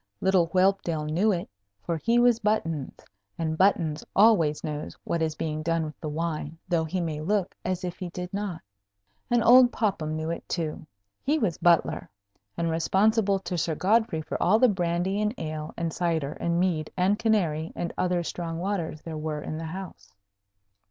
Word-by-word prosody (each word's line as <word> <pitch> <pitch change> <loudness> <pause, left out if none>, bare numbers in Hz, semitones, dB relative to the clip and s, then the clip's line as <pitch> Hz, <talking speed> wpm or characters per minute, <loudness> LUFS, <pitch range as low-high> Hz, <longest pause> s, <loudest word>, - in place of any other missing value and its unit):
Little 190 -3 +3
Whelpdale 185 -3 +1
knew 175 +8 +2
it, 175 -3 -2 0.4
for 170 - -1
he 230 +9 +1
was 240 -1 +5
Buttons, 170 -10 -2 0.3
and 160 -1 -1
Buttons 165 -4 +2
always 185 -8 +4
knows 150 -1 -5
what 170 - -1
is 160 -1 0
being 155 -1 -3
done 165 0 0
with 155 - -8
the 155 - -4
wine, 160 0 -3
though 170 -3 +1
he 180 +4 -2
may 160 -3 -2
look 195 +2 0
as 185 0 -2
if 180 -1 -5
he 180 -2 -4
did 180 +2 -6
not. 200 -4 -3 0.7
And 240 -1 +3
old 245 +1 +7
Popham 175 -8 -1
knew 160 +1 -2
it, 170 - -6
too. 155 -2 -3 0.3
He 295 +3 +1
was 205 - -1
Butler, 170 -1 +2 0.5
and 165 -1 0
responsible 200 +5 +2
to 180 -2 -3
Sir 160 0 0
Godfrey 195 -3 +2
for - - -4
all 195 +5 +5
the 255 +2 +6
brandy, 180 +1 0
and 210 +3 0
ale, 155 -1 -5
and 165 -1 -2
cider, 165 -5 0
and 170 0 -1
mead, 170 -4 0
and 195 +4 +2
canary, 175 -9 +1
and 170 - -3
other 180 -1 0
strong 165 -1 -4
waters 170 -4 -3
there 160 -2 -5
were 150 -1 -3
in 155 - -4
the 165 - -5
house. 160 - -8
170 Hz, 180 wpm, -27 LUFS, 160-195 Hz, 0.7 s, old